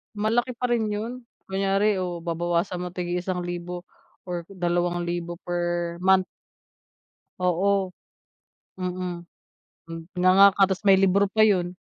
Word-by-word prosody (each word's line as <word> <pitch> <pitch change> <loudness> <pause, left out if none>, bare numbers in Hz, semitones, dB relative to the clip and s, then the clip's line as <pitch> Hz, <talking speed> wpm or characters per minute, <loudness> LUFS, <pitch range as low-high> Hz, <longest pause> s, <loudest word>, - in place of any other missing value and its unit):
Malaki 225 +4 +1
pa 250 - 0
rin 230 -3 0
yun, 230 +4 -4 0.2
kunyari 195 +2 +1
o 180 -2 -3
babawasan 175 +2 -1
mo 180 - -5
tig-iisang 180 +1 -3
libo 175 0 -6 0.4
or 175 -1 -3
dalawang 175 -1 -1
libo 175 0 -4
per 175 -1 -2
month. 190 0 +4 1.1
Oo, 190 +2 +1 0.9
mhm, 180 -1 -4 0.7
mm, 165 0 -7 0.2
nganga 190 +2 +7
ka 195 - +5
tapos 190 +2 -3
may 195 -2 +6
libro 195 +1 +4
pa 220 +1 +4
yun. 180 -3 +1
180 Hz, 125 wpm, -25 LUFS, 175-195 Hz, 1.1 s, nganga